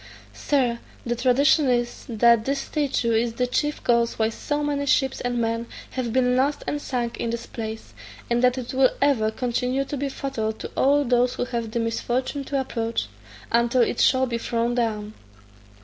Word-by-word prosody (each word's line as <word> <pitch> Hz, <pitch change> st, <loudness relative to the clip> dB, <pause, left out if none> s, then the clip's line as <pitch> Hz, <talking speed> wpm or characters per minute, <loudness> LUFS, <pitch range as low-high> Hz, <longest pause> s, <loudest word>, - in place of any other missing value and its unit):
Sir, 240 Hz, -, 0 dB, 0.3 s
the 240 Hz, 0 st, -1 dB
tradition 270 Hz, +4 st, +3 dB
is, 240 Hz, -1 st, -1 dB
that 235 Hz, 0 st, +4 dB
this 275 Hz, +1 st, 0 dB
statue 275 Hz, -6 st, -1 dB
is 225 Hz, +1 st, +1 dB
the 250 Hz, +2 st, 0 dB
chief 295 Hz, +4 st, -1 dB
cause 235 Hz, -1 st, +2 dB
why 220 Hz, 0 st, +2 dB
so 290 Hz, +6 st, -3 dB
many 285 Hz, -1 st, -1 dB
ships 265 Hz, -1 st, +2 dB
and 245 Hz, 0 st, -1 dB
men 230 Hz, 0 st, -1 dB, 0.2 s
have 250 Hz, -3 st, -3 dB
been 250 Hz, 0 st, +2 dB
lost 275 Hz, +3 st, +1 dB
and 290 Hz, -, -2 dB
sunk 240 Hz, -4 st, -3 dB
in 235 Hz, -, -2 dB
this 235 Hz, 0 st, -4 dB
place, 220 Hz, -1 st, -7 dB, 0.3 s
and 240 Hz, +1 st, +1 dB
that 250 Hz, +1 st, +4 dB
it 250 Hz, -1 st, -5 dB
will 260 Hz, -1 st, +5 dB
ever 265 Hz, -7 st, +3 dB
continue 250 Hz, +3 st, -1 dB
to 290 Hz, -, -4 dB
be 280 Hz, +1 st, -2 dB
fatal 265 Hz, -6 st, -3 dB
to -, -, -8 dB
all 285 Hz, +2 st, +3 dB
those 245 Hz, 0 st, +2 dB
who -, -, -1 dB
have 235 Hz, -3 st, -3 dB
the 235 Hz, -, -2 dB
misfortune 245 Hz, +4 st, -2 dB
to 275 Hz, 0 st, -1 dB
approach, 230 Hz, -3 st, -2 dB, 0.4 s
until 235 Hz, +1 st, +3 dB
it 235 Hz, -, -1 dB
shall 260 Hz, 0 st, +4 dB
be 235 Hz, -2 st, -3 dB
thrown 235 Hz, +1 st, -1 dB
down." 215 Hz, -3 st, -1 dB
245 Hz, 185 wpm, -24 LUFS, 235-265 Hz, 0.4 s, will